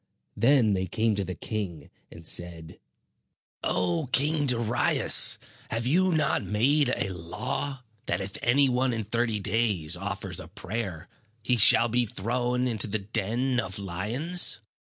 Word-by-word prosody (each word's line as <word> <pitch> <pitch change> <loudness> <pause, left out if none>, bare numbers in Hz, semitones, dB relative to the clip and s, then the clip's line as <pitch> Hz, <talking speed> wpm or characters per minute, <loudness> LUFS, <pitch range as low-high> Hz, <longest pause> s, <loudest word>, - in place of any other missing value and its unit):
Then 115 -1 +3
they 95 -1 -2
came 110 +4 0
to 100 -1 -2
the 90 -1 -6
king, 90 -7 -6 0.2
and 80 - -14
said: 85 -1 -1 0.8
"O 90 +6 0
King 145 +2 +2
Darius, 120 -2 +3 0.3
have 115 +1 -3
you 180 +8 +2
not 155 -4 +1
made 135 +6 +2
a 100 -5 -1
law, 125 +10 -5 0.2
that - - -1
if 95 0 -6
any 135 +3 +3
one 125 0 0
in 115 -1 -3
thirty 115 0 -1
days 100 -6 0
offers 95 +3 -5
a - - -10
prayer, 95 -4 -6 0.4
he 125 - +1
shall 115 +1 +8
be 120 +1 0
thrown 125 +5 -2
into 110 -3 -1
the 105 +2 -2
den 115 +5 -2
of 95 -2 -4
lions?" 110 - 0
115 Hz, 145 wpm, -26 LUFS, 95-125 Hz, 0.8 s, shall